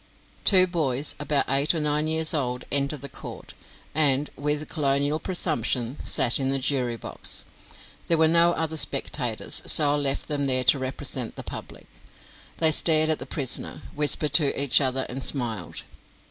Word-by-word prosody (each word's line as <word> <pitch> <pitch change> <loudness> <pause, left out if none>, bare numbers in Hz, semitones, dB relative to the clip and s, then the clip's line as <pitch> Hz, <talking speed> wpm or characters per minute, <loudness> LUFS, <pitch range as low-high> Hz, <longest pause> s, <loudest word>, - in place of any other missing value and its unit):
Two 185 -2 +7
boys 150 -6 -2
about 145 -1 +1
eight 140 +5 +1
or - - -2
nine 150 0 0
years 160 0 +2
old 125 -4 -3
entered 140 +1 0
the 140 - -6
court, - - -10 0.4
and, 145 -1 +2
with 150 +1 -2
colonial 145 0 0
presumption, 125 - -2
sat 120 - +2
in 135 -1 -1
the 135 - 0
jury 130 -3 -2
box. - - -3 0.6
There 165 - +3
were 160 0 +4
no 170 +1 +4
other 160 -1 -4
spectators, 125 -6 -1
so 145 -2 +4
I 145 - +1
left 140 -2 -1
them 145 -2 -1
there 130 -1 +2
to 135 - +4
represent 130 -2 -4
the - - -7
public. - - -9 0.7
They 160 -1 +5
stared 155 0 +5
at 155 - -1
the - - -8
prisoner, 135 -5 -3
whispered 150 0 +1
to 145 -2 +2
each 140 0 +3
other, 130 -1 -1
and 130 +2 -6
smiled. 115 - -1
145 Hz, 165 wpm, -24 LUFS, 130-155 Hz, 0.7 s, Two